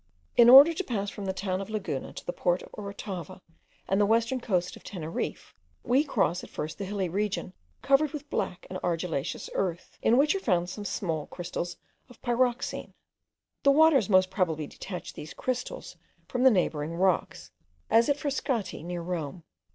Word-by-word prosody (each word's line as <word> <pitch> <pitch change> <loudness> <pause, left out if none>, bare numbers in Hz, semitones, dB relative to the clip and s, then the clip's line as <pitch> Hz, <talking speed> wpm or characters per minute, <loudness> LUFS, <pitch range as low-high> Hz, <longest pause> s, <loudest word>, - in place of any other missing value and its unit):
In 235 0 +8
order 280 +6 +10
to 385 - -3
pass 205 - -2
from 200 - -7
the 190 - 0
town 190 0 -2
of 195 - -7
Laguna 200 -11 -3
to - - -9
the 175 - -3
port 175 0 0
of - - -13
Orotava 195 -3 -6 0.5
and 195 +2 +2
the - - +5
western 230 +3 +2
coast 180 -6 0
of - - -15
Teneriffe, 165 -4 -5 0.3
we 260 +4 +3
cross 195 - 0
at - - -10
first 155 +6 -5
a - - -2
hilly 195 -1 -2
region 200 +1 -2 0.3
covered 275 +2 +4
with 300 -1 -7
black 180 - -2
and 185 - -5
argillaceous 165 -4 -2
earth, 175 -3 -3
in 235 - +4
which 295 +3 +4
are 390 - -1
found 180 - +1
some 205 +2 -7
small 165 -7 -2
crystals 175 0 -5 0.3
of 245 - -16
pyroxene. 245 0 0 0.7
The 280 - +4
waters 280 -7 +5
most 185 -1 +4
probably 165 -6 0
detach 180 +4 -7
these 155 - -9
crystals 255 - -4 0.3
from 250 - -2
the 260 - +8
neighbouring 165 -6 0
rocks, 185 0 0 0.4
as 230 +4 +5
at 285 - +2
Frascati, 275 - -2
near 175 +1 -5
Rome. 170 -2 -4
195 Hz, 175 wpm, -28 LUFS, 175-245 Hz, 0.7 s, order